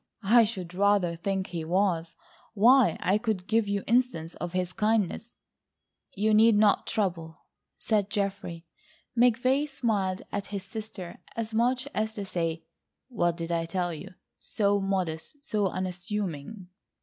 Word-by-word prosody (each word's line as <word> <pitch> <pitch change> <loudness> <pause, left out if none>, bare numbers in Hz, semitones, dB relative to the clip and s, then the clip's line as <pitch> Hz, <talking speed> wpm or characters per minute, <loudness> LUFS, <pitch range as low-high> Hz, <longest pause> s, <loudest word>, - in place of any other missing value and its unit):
I 230 +4 +6
should 185 -5 -5
rather 195 -2 +2
think 190 +2 -2
he 170 -2 -4
was. 170 -1 0 0.4
Why, 235 -2 +5
I 195 +3 +2
could 215 -5 -2
give 220 0 +1
you 200 -1 -1
instances 235 -9 +1
of 175 0 -5
his 180 -1 -1
kindness—" 220 +1 0 0.8
"You 215 +2 +2
need 220 +1 +6
not 210 -1 +3
trouble," 170 -6 -2 0.4
said 210 -3 0
Geoffrey. 195 -5 -3 0.5
McVay 250 +4 +3
smiled 205 -8 -1
at 200 -1 -3
his 200 -2 -5
sister 200 -3 -8 0.2
as 225 -1 -4
much 250 +4 +1
as 220 +1 -1
to 205 - -4
say: 165 -3 -2 0.5
What 175 -8 0
did 170 0 -4
I 165 -1 0
tell 175 0 -1
you?... 185 +4 -9 0.2
so 205 -2 +1
modest, 195 - -3
so 210 -5 0
unassuming. 185 -1 -4
200 Hz, 140 wpm, -28 LUFS, 180-220 Hz, 0.8 s, I